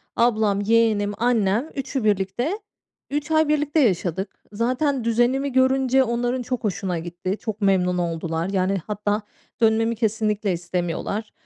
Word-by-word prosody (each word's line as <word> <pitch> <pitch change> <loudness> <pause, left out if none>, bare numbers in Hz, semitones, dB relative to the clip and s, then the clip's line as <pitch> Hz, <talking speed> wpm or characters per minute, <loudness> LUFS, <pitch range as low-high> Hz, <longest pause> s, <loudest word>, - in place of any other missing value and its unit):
Ablam, 215 -4 +2
yeğenim, 215 -1 +2
annem 230 +2 +1
üçü 270 -2 -3
birlikte, 215 - 0 0.5
3 295 +2 -3
ay 315 -1 +4
birlikte 300 +1 +1
yaşadık. 190 - 0
Zaten 255 +5 0
düzenimi 240 +4 +1
görünce 260 0 +3
onların 245 +1 -1
çok 250 0 -3
hoşuna 190 -4 -2
gitti, 175 +4 -4
çok 220 -2 -5
memnun 180 -2 +2
oldular. 165 0 -2
Yani, 195 0 +1
hatta 210 0 -1 0.4
dönmemi 225 +1 +3
kesinlikle 215 -2 0
istemiyorlar. 175 +4 -3
220 Hz, 125 wpm, -23 LUFS, 195-250 Hz, 0.5 s, ay